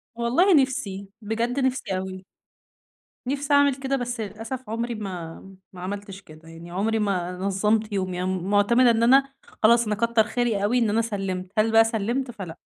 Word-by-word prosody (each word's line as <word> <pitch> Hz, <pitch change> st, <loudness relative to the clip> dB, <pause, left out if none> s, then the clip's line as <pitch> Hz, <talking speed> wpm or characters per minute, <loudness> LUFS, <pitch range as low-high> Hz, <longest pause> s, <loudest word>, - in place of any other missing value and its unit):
والله 255 Hz, +12 st, +3 dB
نفسي، 205 Hz, -8 st, -3 dB
بجد 230 Hz, +5 st, -2 dB
نفسي 260 Hz, -7 st, -1 dB
أوي. 185 Hz, 0 st, -6 dB, 1.0 s
نفسي 280 Hz, +2 st, -1 dB
أعمل 285 Hz, -1 st, +5 dB
كده 270 Hz, 0 st, -2 dB
بس 245 Hz, -2 st, -3 dB
للأسف 225 Hz, +4 st, -6 dB
عمري 235 Hz, +2 st, -3 dB
ما 180 Hz, -6 st, -6 dB, 0.3 s
ما 180 Hz, -, -10 dB
عملتش 195 Hz, +1 st, -6 dB
كده، 155 Hz, -1 st, -15 dB
يعني 165 Hz, +1 st, -11 dB
عمري 220 Hz, +4 st, 0 dB
ما 185 Hz, -4 st, -1 dB
نظمت 210 Hz, +3 st, 0 dB
يومي. 185 Hz, -2 st, -2 dB
أنا -, -, -1 dB, 0.2 s
معتمدة 205 Hz, +6 st, +4 dB
إن 230 Hz, 0 st, +1 dB
أنا 270 Hz, +3 st, +4 dB, 0.3 s
خلاص، 235 Hz, +1 st, +5 dB
أنا 210 Hz, 0 st, -1 dB
كتر 230 Hz, 0 st, +2 dB
خيري 220 Hz, -2 st, -1 dB
أوي 245 Hz, +4 st, +2 dB
إن 230 Hz, -3 st, +2 dB
أنا 220 Hz, +2 st, +2 dB
سلمت، 195 Hz, -4 st, -4 dB
هل 215 Hz, +1 st, +3 dB
بقى 225 Hz, 0 st, +7 dB
سلمت؟ 235 Hz, +4 st, -2 dB
فلأ. 180 Hz, -7 st, -8 dB
220 Hz, 170 wpm, -24 LUFS, 195-240 Hz, 1.0 s, بقى